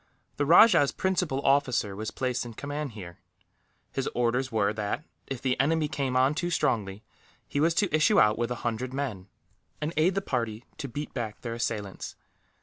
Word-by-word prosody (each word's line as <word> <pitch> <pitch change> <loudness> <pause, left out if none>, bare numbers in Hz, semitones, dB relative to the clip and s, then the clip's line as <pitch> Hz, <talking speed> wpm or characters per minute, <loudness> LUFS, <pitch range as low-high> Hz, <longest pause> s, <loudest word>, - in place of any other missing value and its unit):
The 145 - 0
rajah's 170 -3 +7
principal 180 -7 -1
officer 125 -7 +2
was 110 +2 -4
placed 130 -1 -2
in 120 -2 -9
command 145 -1 -4
here. 90 -5 -9 0.7
His 135 - -2
orders 125 +2 +1
were 105 -2 +1
that, 105 +7 -3 0.2
if 135 -3 -5
the 130 -2 0
enemy 155 +3 +2
came 135 -4 -2
on 130 +3 +4
too 175 +3 -2
strongly, 105 - 0 0.4
he 145 - -2
was 165 +2 +3
to 190 -6 +2
issue 155 +7 +4
out 105 0 +5
with 120 +1 -1
a 125 - -2
hundred 125 +3 -2
men, 115 -10 -3 0.5
and 155 +2 -3
aid 175 +5 +3
the 195 - +1
party 115 - -2
to 140 - -3
beat 145 +4 -6
back 115 -4 -4
their 115 -2 -4
assailants. 110 -4 -4
130 Hz, 180 wpm, -28 LUFS, 110-150 Hz, 0.7 s, rajah's